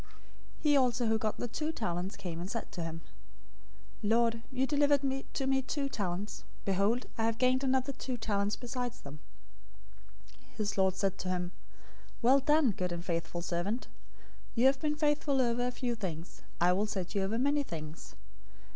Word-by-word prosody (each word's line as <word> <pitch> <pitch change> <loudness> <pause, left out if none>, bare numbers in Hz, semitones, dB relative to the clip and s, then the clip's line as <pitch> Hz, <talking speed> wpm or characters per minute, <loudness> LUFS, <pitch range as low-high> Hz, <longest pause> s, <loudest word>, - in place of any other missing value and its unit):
025:022 - - -21 0.5
"He 295 -2 +5
also 250 -2 +3
who 220 0 +3
got 215 -1 -1
the 245 - -2
two 305 +7 -2
talents 180 - -2
came 175 -5 -5
and 180 +2 -4
said, 165 -7 -4 1.0
'Lord, 230 +2 +3
you 260 0 +1
delivered 285 0 +3 0.3
to 270 - 0
me 265 0 +3
two 275 +1 -2
talents. 200 -3 -3 0.2
Behold, 200 +5 +2
I 225 - +3
have 225 0 +1
gained 255 +2 +3
another 265 +1 +2
two 255 -1 -4
talents 205 -2 0
besides 245 -1 -4
them.' 145 +2 -9 1.3
025:023 - - -24
"His 205 -2 -1
lord 190 -1 +4
said 195 -1 0
to 185 - -3
him, 180 -1 -1 0.7
'Well 260 +4 +7
done, 295 -2 +4
good 180 -2 -2
and 170 0 -4
faithful 170 -1 -2
servant. 180 +8 -2 0.7
You 240 +2 +4
have 270 0 +5
been 300 -1 +1
faithful 295 -2 +2
over 245 0 +2
a - - +1
few 245 -1 -2
things, 180 -6 -5 0.2
I 175 +1 +5
will 205 +3 +1
set 190 -4 -3
you 200 - +1
over 195 +4 0
many 285 +4 +3
things. 160 - -7
225 Hz, 175 wpm, -32 LUFS, 185-260 Hz, 1.3 s, Well